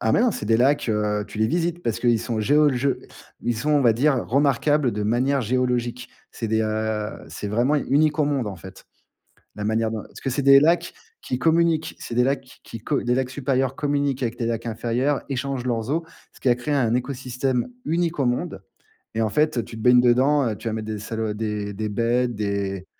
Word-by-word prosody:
Ah, 110 Hz, -2 st, +1 dB
mais -, -, +4 dB
non, 245 Hz, -, +4 dB
c'est 145 Hz, -, -5 dB
des 110 Hz, +1 st, +4 dB
lacs, 140 Hz, +2 st, +2 dB
heu, 105 Hz, -1 st, 0 dB
tu -, -, -9 dB
les 110 Hz, -, +3 dB
visites 175 Hz, +5 st, -1 dB
parce 115 Hz, -5 st, -1 dB
qu'ils 120 Hz, -2 st, +3 dB
sont 115 Hz, -3 st, -3 dB
géologiques. 140 Hz, +1 st, +3 dB, 0.5 s
Ils 120 Hz, -1 st, -1 dB
sont, 150 Hz, +7 st, -1 dB
on 145 Hz, -, +4 dB
va 120 Hz, -4 st, +5 dB
dire, 130 Hz, 0 st, +1 dB
remarquables 140 Hz, +1 st, +2 dB
de 105 Hz, -, -3 dB
manière 130 Hz, +6 st, +1 dB
géologique. 125 Hz, 0 st, -1 dB, 0.2 s
C'est 115 Hz, -, -5 dB
des, 110 Hz, 0 st, +1 dB
heu, 110 Hz, -1 st, -1 dB, 0.2 s
c'est 105 Hz, -, -6 dB
vraiment 120 Hz, +8 st, +2 dB
unique 150 Hz, +2 st, +2 dB
au 150 Hz, -, +4 dB
monde, 140 Hz, -5 st, -1 dB
en 100 Hz, -3 st, -5 dB
fait. 95 Hz, +2 st, -12 dB, 0.7 s
La 105 Hz, -, -5 dB
manière 110 Hz, +1 st, +1 dB
dont 110 Hz, -1 st, -4 dB
parce -, -, -13 dB
que 135 Hz, -, -3 dB
c'est 135 Hz, +3 st, -1 dB
des 140 Hz, 0 st, +8 dB
lacs 165 Hz, +4 st, +2 dB, 0.3 s
qui 125 Hz, -, -3 dB
communiquent. 165 Hz, 0 st, +2 dB
C'est -, -, -7 dB
des 125 Hz, -, +4 dB
lacs 135 Hz, +1 st, 0 dB
qui-qui 125 Hz, -3 st, -12 dB
co 140 Hz, +6 st, -1 dB
des 125 Hz, 0 st, +1 dB
lacs 130 Hz, -1 st, 0 dB
supérieurs 135 Hz, -1 st, -1 dB
communiquent 140 Hz, -2 st, -1 dB
avec 120 Hz, -1 st, -2 dB
les 115 Hz, -, -1 dB
lacs 115 Hz, 0 st, -3 dB
inférieurs, 120 Hz, +5 st, -1 dB
échangent 135 Hz, -1 st, -3 dB
leurs 115 Hz, -1 st, -1 dB
eaux, 165 Hz, +3 st, 0 dB, 0.3 s
ce -, -, -18 dB
qui 130 Hz, -, +2 dB
a 120 Hz, -, +4 dB
créé 125 Hz, +5 st, -3 dB
un 120 Hz, -5 st, +2 dB
écosystème 125 Hz, 0 st, -1 dB, 0.2 s
unique 170 Hz, 0 st, 0 dB
au 135 Hz, -, +2 dB
monde. 125 Hz, -, -2 dB, 0.5 s
Et 115 Hz, -, 0 dB
en 110 Hz, -, +1 dB
fait, 150 Hz, 0 st, +1 dB
tu 115 Hz, -, -10 dB
te 110 Hz, -, -7 dB
baignes 125 Hz, 0 st, +6 dB
dedans, 130 Hz, +3 st, +3 dB
heu, 110 Hz, -, -3 dB
tu -, -, -7 dB
vas 110 Hz, -, -1 dB
mettre 110 Hz, -1 st, -4 dB
des 110 Hz, -1 st, -4 dB
salo 110 Hz, 0 st, -3 dB
des 105 Hz, -1 st, -3 dB
des 110 Hz, +2 st, -3 dB
bêtes, 120 Hz, +3 st, 0 dB
des 100 Hz, -2 st, -2 dB
125 Hz, 220 wpm, -23 LUFS, 110-140 Hz, 0.7 s, des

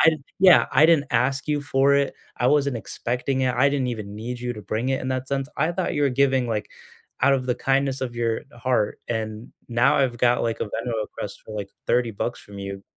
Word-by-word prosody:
I 160 Hz, -, +7 dB, 0.3 s
yeah, 185 Hz, -2 st, +7 dB
"I 150 Hz, +4 st, +6 dB
didn't 160 Hz, -4 st, +4 dB
ask 135 Hz, +5 st, +1 dB
you 150 Hz, -1 st, +1 dB
for 140 Hz, 0 st, +3 dB
it. 140 Hz, -1 st, 0 dB, 0.2 s
I 125 Hz, -, +2 dB
wasn't 140 Hz, -3 st, +2 dB
expecting 125 Hz, +6 st, -2 dB
it. 125 Hz, -, +2 dB
I 130 Hz, +3 st, +4 dB
didn't 140 Hz, -3 st, 0 dB
even 105 Hz, -4 st, -5 dB
need 120 Hz, +3 st, -5 dB
you 125 Hz, 0 st, -2 dB
to 105 Hz, -, -9 dB
bring 110 Hz, +6 st, -2 dB
it 135 Hz, -, 0 dB
in 130 Hz, -, -3 dB
that 130 Hz, 0 st, -2 dB
sense. 135 Hz, 0 st, -2 dB
I 165 Hz, -, +1 dB
thought 180 Hz, 0 st, -1 dB
you 145 Hz, -, 0 dB
were 140 Hz, -, +4 dB
giving," 130 Hz, -1 st, +2 dB
like, 105 Hz, -2 st, -2 dB, 0.5 s
"out 140 Hz, -, +5 dB
of 130 Hz, -1 st, -2 dB
the 125 Hz, -, +1 dB
kindness 135 Hz, +1 st, 0 dB
of 125 Hz, -2 st, -3 dB
your 115 Hz, -1 st, -1 dB
heart, 120 Hz, -3 st, 0 dB
and 110 Hz, 0 st, -4 dB, 0.2 s
now 120 Hz, +5 st, +3 dB
I've 130 Hz, -4 st, +1 dB
got," 120 Hz, 0 st, +3 dB
like, 115 Hz, -1 st, -2 dB
"a -, -, +1 dB
Venmo 120 Hz, +3 st, -4 dB
request 105 Hz, -1 st, -7 dB
for," 110 Hz, -, -10 dB
like, 100 Hz, -1 st, -5 dB, 0.2 s
"30 120 Hz, -1 st, +2 dB
bucks 120 Hz, +4 st, -3 dB
from 100 Hz, -1 st, -12 dB
you." 100 Hz, 0 st, -6 dB
125 Hz, 230 wpm, -24 LUFS, 115-140 Hz, 0.5 s, I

